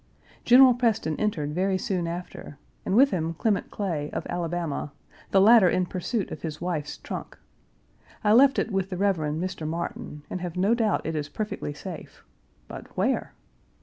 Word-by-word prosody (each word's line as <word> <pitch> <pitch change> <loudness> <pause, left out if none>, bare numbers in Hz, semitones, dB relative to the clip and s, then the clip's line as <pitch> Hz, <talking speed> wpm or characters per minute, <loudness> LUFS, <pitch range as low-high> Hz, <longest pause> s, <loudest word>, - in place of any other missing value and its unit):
General 255 +1 +8
Preston 225 -9 0
entered 155 -9 -1
very 190 +3 +1
soon 185 -4 -2
after, 170 -4 -7 0.3
and 190 - +1
with 275 +4 +6
him 165 -2 -2
Clement 205 +3 0
Clay, 165 -8 -3
of - - -3
Alabama, 170 -4 -3 0.4
the 195 - +4
latter 210 -1 +7
in 185 +1 +1
pursuit 185 +4 -3
of - - -7
his 155 -2 -5
wife's 160 -4 -3
trunk. - - -7 0.9
I 210 0 +4
left 270 +3 +6
it - - 0
with 195 -1 -1
the 185 - -4
Rev. 195 -1 +2
Mr. 155 +2 -3
Martin, 160 -2 -5
and 185 - -5
have 180 -1 -5
no 195 +5 +3
doubt 225 -3 +1
it 160 - -2
is 150 -1 -3
perfectly 210 -8 -4
safe, 175 0 -9 0.4
but - - -9
where? - - 0
180 Hz, 170 wpm, -26 LUFS, 160-210 Hz, 0.9 s, General